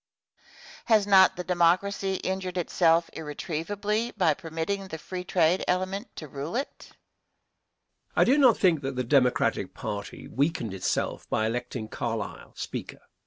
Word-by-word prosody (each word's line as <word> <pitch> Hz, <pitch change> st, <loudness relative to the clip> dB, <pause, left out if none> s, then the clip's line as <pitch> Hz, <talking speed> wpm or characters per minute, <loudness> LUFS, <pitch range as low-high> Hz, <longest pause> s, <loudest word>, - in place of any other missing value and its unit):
Has 220 Hz, -3 st, +4 dB
not 190 Hz, -2 st, +6 dB
the 180 Hz, -, -4 dB
Democracy 185 Hz, +3 st, +2 dB
injured 185 Hz, -1 st, -3 dB
itself 170 Hz, -1 st, +3 dB
irretrievably 200 Hz, +9 st, -3 dB
by 170 Hz, -6 st, +4 dB
permitting 170 Hz, +4 st, -4 dB
the 160 Hz, -, -6 dB
free 180 Hz, +3 st, -6 dB
trade 175 Hz, 0 st, +2 dB
element 185 Hz, +5 st, -2 dB
to 155 Hz, -, -7 dB
rule 145 Hz, -, -5 dB
it? 270 Hz, +3 st, -4 dB
Answer. -, -, -21 dB, 1.2 s
I -, -, +5 dB
do 275 Hz, +4 st, +4 dB
not 255 Hz, -5 st, +6 dB
think 170 Hz, -6 st, +3 dB
that 135 Hz, -1 st, -4 dB
the 125 Hz, -, -1 dB
Democratic 125 Hz, 0 st, +2 dB
party 105 Hz, -2 st, -6 dB
weakened 140 Hz, -, -1 dB
itself 95 Hz, -1 st, -2 dB
by 110 Hz, -, +1 dB
electing 115 Hz, 0 st, -3 dB
Carlisle, 115 Hz, -2 st, -5 dB
Speaker. -, -, -6 dB
175 Hz, 140 wpm, -27 LUFS, 145-195 Hz, 1.2 s, not